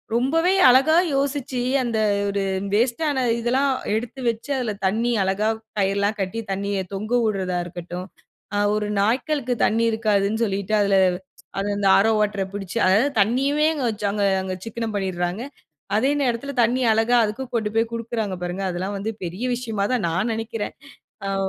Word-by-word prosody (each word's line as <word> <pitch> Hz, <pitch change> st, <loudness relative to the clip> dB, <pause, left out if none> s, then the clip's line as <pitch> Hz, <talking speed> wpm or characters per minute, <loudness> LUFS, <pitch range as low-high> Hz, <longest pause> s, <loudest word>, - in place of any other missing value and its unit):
ரொம்பவே 325 Hz, +9 st, +2 dB, 0.2 s
அழகா 270 Hz, +6 st, +5 dB, 0.2 s
யோசிச்சு 275 Hz, -2 st, -1 dB, 0.2 s
அந்த 235 Hz, -2 st, -1 dB, 0.3 s
ஒரு 200 Hz, 0 st, -1 dB, 0.3 s
வேஸ்ட்டான 260 Hz, +5 st, +1 dB, 0.2 s
இதெல்லாம் 260 Hz, +4 st, +1 dB, 0.2 s
எடுத்து 240 Hz, +4 st, -4 dB
வச்சு 230 Hz, +3 st, -5 dB
அதுல 245 Hz, -4 st, -1 dB
தண்ணி 225 Hz, +5 st, +1 dB
அழகா 195 Hz, +3 st, +1 dB, 0.3 s
கயிர்லாம் 200 Hz, +2 st, +1 dB
கட்டி 195 Hz, +4 st, -3 dB
தண்ணிய 200 Hz, +1 st, -1 dB
தொங்க 210 Hz, +3 st, -5 dB, 0.2 s
உட்றதா 190 Hz, -4 st, -1 dB
இருக்கட்டும், 175 Hz, +1 st, -7 dB, 0.5 s
அ -, -, +2 dB, 0.2 s
ஒரு 210 Hz, -1 st, -1 dB
நாய்களுக்கு 250 Hz, +4 st, 0 dB
தண்ணி 225 Hz, +2 st, +1 dB
இருக்காதுன்னு 215 Hz, -1 st, +1 dB
சொல்லிட்டு 200 Hz, 0 st, -2 dB
அதுல 200 Hz, -1 st, +3 dB, 0.6 s
அத 200 Hz, -, -2 dB
இந்த 200 Hz, -1 st, +2 dB, 0.2 s
RO 225 Hz, -, +3 dB
வாட்டர 205 Hz, -2 st, 0 dB
புடிச்சு 200 Hz, +2 st, -4 dB
அதாவது 210 Hz, +9 st, +4 dB
தண்ணியுமே 275 Hz, +8 st, +2 dB
அங்க 285 Hz, -4 st, -3 dB
வச்சு 210 Hz, -1 st, -3 dB
அங்க 205 Hz, -1 st, 0 dB, 0.2 s
அங்க 185 Hz, -1 st, -4 dB
சிக்கனம் 225 Hz, -1 st, -4 dB
பண்ணிறாங்க 185 Hz, +1 st, -2 dB, 0.5 s
அதே 265 Hz, +6 st, +2 dB
நேரத்துல 260 Hz, +2 st, -1 dB
தண்ணீ 245 Hz, +3 st, +2 dB
அழகா 225 Hz, +3 st, +3 dB
அதுக்கும் 230 Hz, +5 st, -4 dB
கொண்டு 215 Hz, -2 st, -1 dB
போய் 225 Hz, 0 st, +2 dB
குடுக்குறாங்க 230 Hz, -4 st, -3 dB
பாருங்க, 180 Hz, +2 st, -3 dB
அதெல்லாம் 185 Hz, +3 st, -3 dB
வந்து 220 Hz, +3 st, -3 dB
பெரிய 180 Hz, +7 st, -5 dB
விஷயமா 225 Hz, -5 st, -2 dB
தான் 220 Hz, -8 st, 0 dB
நான் 185 Hz, +8 st, 0 dB
நெனைக்கிறேன், 225 Hz, -1 st, -4 dB, 0.5 s
அவ் 195 Hz, 0 st, 0 dB
220 Hz, 155 wpm, -23 LUFS, 195-245 Hz, 0.6 s, அழகா